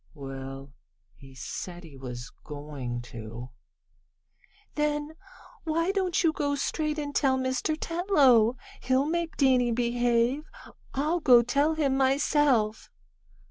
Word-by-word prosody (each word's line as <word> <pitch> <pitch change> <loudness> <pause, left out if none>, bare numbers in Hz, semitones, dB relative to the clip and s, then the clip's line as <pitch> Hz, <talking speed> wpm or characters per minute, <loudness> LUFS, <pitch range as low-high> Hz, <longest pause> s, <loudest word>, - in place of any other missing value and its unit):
"Well, 135 0 -8 0.4
he 135 -1 -16
said 175 +8 -7
he 155 -4 -13
was 125 -2 -8
going 145 -5 -6
to." 120 +1 -9 1.2
"Then 295 0 -1 0.5
why 330 +3 0
don't 375 -3 0
you 325 -2 +3
go 285 -2 -1
straight 305 +2 -2
and 290 -1 -4
tell 265 -3 +2
Mr. 260 +4 -1
Tetlow? 275 - +3 0.2
He'll 260 +2 +2
make 335 +1 -2
Danny 255 -3 +3
behave. 240 +3 +1 0.5
I'll 305 +6 +1
go 250 -6 +6
tell 285 +6 +1
him 280 -4 +1
myself!" 265 -5 +2
260 Hz, 115 wpm, -27 LUFS, -, 1.2 s, go